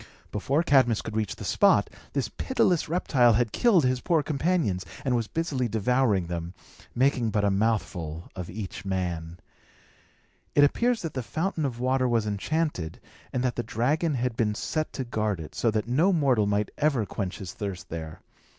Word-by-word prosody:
Before 135 +10 0
Cadmus 130 -8 +3
could 110 - -6
reach 110 -2 -1
the - - -9
spot, - - +4 0.3
this 135 -6 0
pitiless 180 - +1
reptile 130 -8 +3
had 115 0 +1
killed 195 - +4
his 130 0 +1
poor 165 -4 +2
companions, 145 - 0 0.2
and 130 -2 +2
was 115 -2 0
busily 145 -5 -1
devouring 110 -3 +1
them, 85 +1 -5 0.4
making 125 -2 +2
but 105 -1 0
a 100 - +3
mouthful 95 -6 -1
of 90 -2 -6
each 100 0 -6
man. 90 -4 -3 1.2
It 145 - +6
appears 235 +10 +2
that 165 - -4
the 130 - -2
fountain 160 +5 -2
of 120 -4 -3
water 130 +1 +2
was 115 -2 +2
enchanted, 105 - -2 0.3
and 125 - -1
that 125 -2 0
the - - +1
dragon 145 +8 0
had 125 -1 -1
been 105 -2 0
set 155 +6 -2
to 135 - -3
guard 110 -5 -1
it, 80 - -8
so 115 - +1
that 110 0 -1
no 155 +11 +3
mortal 135 - +3
might 105 +1 0
ever 140 -7 +2
quench 95 -2 -4
his 90 -2 -7
thirst 100 -3 -6
there. 80 -1 -6
120 Hz, 180 wpm, -27 LUFS, 100-145 Hz, 1.2 s, It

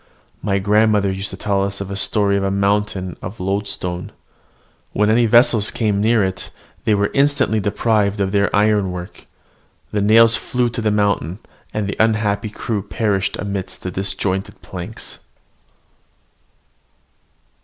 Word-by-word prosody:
My 100 -2 0
grandmother 105 0 +3
used 95 +1 -3
to 95 - -8
tell 100 -1 0
us 100 0 -3
a 100 0 -5
story 100 0 +1
of 100 - 0
a 95 - +1
mountain 100 -2 0
of 95 +5 -7
loadstone. 95 -2 -3 0.8
When 105 +1 +2
any 115 +1 +4
vessels 120 -2 +5
came 105 -3 0
near 110 0 +3
it, 95 -1 -3 0.4
they 110 -2 +3
were 100 0 0
instantly 140 -5 +2
deprived 105 0 0
of 95 -1 0
their 100 0 +2
ironwork: 100 -4 0 0.6
the 105 - 0
nails 115 +2 +6
flew 125 -1 -1
to 115 - -4
the 110 - +1
mountain, 100 -5 0 0.3
and 105 -2 -2
the 100 - -4
unhappy 110 -1 +1
crew 105 0 -3
perished 100 -1 -1
amidst 100 -2 -4
the 95 - -3
disjointed 95 0 -3
planks. - - -6
100 Hz, 140 wpm, -19 LUFS, 95-110 Hz, 0.8 s, nails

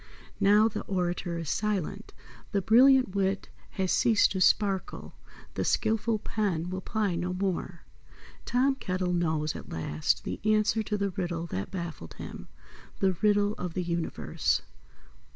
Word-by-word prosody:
Now 210 +2 +5
the 225 - -4
orator 175 -2 -2
is 165 -3 -3
silent, 205 0 -2 0.4
the 200 - +2
brilliant 255 0 +6
wit 195 0 0 0.3
has 190 -2 +1
ceased 225 -3 +4
to 190 - -2
sparkle, 195 0 +1 0.4
the - - -2
skilful 225 0 +1
pen 195 -6 -2
will 185 0 -3
ply 210 -2 -1
no 180 +2 -2
more. 180 -2 -3 0.6
Tom 260 +3 +2
Kettle 185 -7 -2
knows 160 -3 0
at - - -9
last 80 -1 -1
the - - -4
answer 215 +1 +2
to 210 0 -2
the 200 -1 -1
riddle 175 -2 -3
that 95 - -4
baffled 170 - -6
him, - - -8 0.5
the 190 -1 +2
Riddle 205 -1 +3
of 180 -2 -4
the 185 - -1
Universe. 170 -1 -1
190 Hz, 145 wpm, -28 LUFS, 175-210 Hz, 0.6 s, brilliant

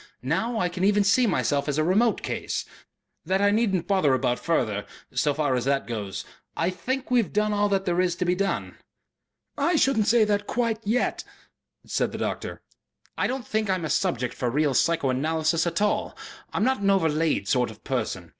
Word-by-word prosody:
Now 220 - -1
I 180 - +1
can 180 +1 -4
even 205 +1 +4
see 235 +5 +4
myself 145 -6 0
as 145 - -1
a 155 - +2
remote 210 +7 +2
Case. - - -3 0.6
That 190 +1 0
I 205 0 +4
needn't 205 -5 +1
bother 170 -9 +3
about 125 -1 0
further.... 110 -11 -1 0.3
So 150 - +2
far 145 -3 +1
as 125 -1 -1
that 140 0 +1
goes, 105 -5 -5 0.3
I 170 +3 +1
think 255 +9 -4
we 250 - +5
have 210 - -6
done 210 0 +1
all 205 0 +2
that 195 -1 0
there 175 0 +1
is 180 -2 0
to 180 - -2
be 180 - +2
done." 195 +1 -2 0.8
"I 345 - +2
shouldn't 265 -8 +2
say 230 -1 +5
that 205 -1 0
quite 230 -3 0
yet," 240 +4 0 0.6
said - - -1
the - - -4
doctor. - - -4 0.5
"I - - 0
don't 255 -1 -4
think 215 -1 -1
I'm 185 -3 0
a - - -2
subject 125 -1 0
for 125 - -2
real 145 +2 +1
psychoanalysis 160 +3 +1
at 170 +4 0
all. 210 - -1 0.3
I'm - - 0
not 260 0 +2
an 200 - +2
overlaid 160 - +1
sort 125 +2 +2
of 110 - -13
person. - - -3
180 Hz, 195 wpm, -25 LUFS, 150-210 Hz, 0.8 s, we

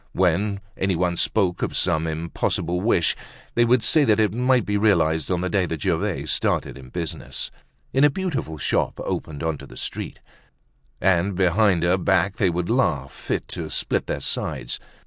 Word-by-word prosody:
When 95 +3 +1
any 95 -1 0
one 90 0 +1
spoke 90 0 +1
of - - -1
some 80 -3 +1
impossible 85 +2 -1
wish, 95 -6 +2 0.4
they 120 - +4
would 120 -1 +3
say 155 +4 +4
that 110 -3 +3
it 105 -3 +2
might 125 0 +2
be 105 - -1
realized 80 -7 +2
on 90 -2 0
the 90 - 0
day 95 -3 +1
that 80 -3 -4
Gervaise - - 0
started - - 0
in 65 -2 -11
business, 85 +1 -4 0.4
in 135 +2 +4
a 145 - +7
beautiful 145 - -3
shop - - 0
opening 75 -1 -4
onto 80 -3 -4
the - - -13
street. - - -5 0.8
And 95 +1 +2
behind 95 0 +3
her 90 +2 +3
back 95 +1 +2
they 95 - +3
would 85 0 -2
laugh 85 - +1
fit - - -3
to - - -5
split - - -1
their - - -2
sides. - - -2
90 Hz, 175 wpm, -23 LUFS, 85-105 Hz, 0.8 s, a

